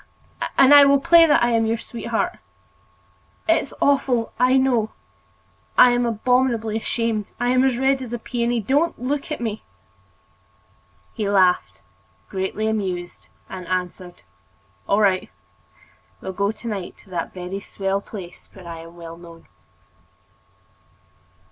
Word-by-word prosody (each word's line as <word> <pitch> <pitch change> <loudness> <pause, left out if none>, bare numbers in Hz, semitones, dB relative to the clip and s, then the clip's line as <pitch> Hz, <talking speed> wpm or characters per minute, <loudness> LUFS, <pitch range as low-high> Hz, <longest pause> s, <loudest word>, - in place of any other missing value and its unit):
And 270 +1 +7
I 285 0 +10
will 280 0 +5
play 335 +3 +6
that 295 - +4
I 240 - +2
am 225 -1 +2
your 225 +1 0
sweetheart. 230 0 -3 1.1
It's 330 -4 +2
awful, 260 -5 +1
I 255 +1 +4
know—I 250 0 0
am 245 0 +1
abominably 235 -1 +1
ashamed, 225 -2 -2
I 245 - 0
am 255 +1 +3
as 260 -3 +2
red 265 +1 +1
as 250 -3 -7
a 240 - -2
peony. 235 0 -1
Don't 285 - 0
look 285 +5 -3
at 305 - -3
me!" 220 -3 -4 1.5
He 210 -4 -2
laughed, 180 - +2 0.5
greatly 190 +3 -3
amused, 190 -5 -3 0.2
and 185 -2 -8
answered: 180 0 -4 0.7
"All 200 +2 +3
right, 190 -3 +2 0.9
we - - -16
will 190 - -4
go 200 +2 0
to 220 +2 -10
night 200 -5 -5
to 185 -3 -13
a 165 - -1
very 185 +1 -6
swell 195 0 -3
place 190 -4 -10
where 185 -3 -13
I 165 -1 -7
am 165 +1 -12
well 165 -1 -10
known." 170 -1 -14
220 Hz, 140 wpm, -22 LUFS, 190-250 Hz, 1.5 s, I